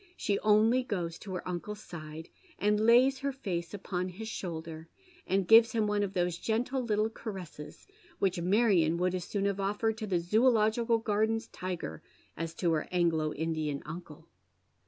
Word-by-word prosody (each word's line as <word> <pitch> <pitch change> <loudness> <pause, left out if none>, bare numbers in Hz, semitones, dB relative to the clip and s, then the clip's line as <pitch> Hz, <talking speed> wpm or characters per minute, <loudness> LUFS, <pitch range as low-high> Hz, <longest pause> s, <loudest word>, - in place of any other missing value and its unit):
She 200 -1 0
only 215 +4 +4
goes 175 -8 -3
to 190 -3 -6
her 180 - -5
uncle's 185 +4 -4
side, 155 -1 -9 0.3
and 210 +1 +2
lays 255 +3 +5
her 280 +1 -1
face 180 -10 -4
upon 185 -2 -3
his 210 +5 -7
shoulder, 165 -5 -6 0.4
and 190 -1 +1
gives 225 +2 +7
him 220 -2 +2
one 210 0 +1
of 200 -1 -2
those 175 -2 0
gentle 245 +4 -1
little 215 -2 +1
caresses 190 -9 -8 0.3
which 185 -3 0
Marion 180 -4 +3
would 180 +1 +1
as 180 -1 -3
soon 200 -1 -2
have 200 0 0
offered 210 +3 0
to 215 - -4
the 180 -3 +1
Zoological 225 +4 +3
Garden's 220 +1 0
tiger 175 - -5 0.3
as 165 0 -5
to 175 -3 +1
her 155 -2 0
Anglo 165 -4 +1
Indian 155 -2 -2
uncle. 155 -1 -9
195 Hz, 165 wpm, -30 LUFS, 170-220 Hz, 0.4 s, gives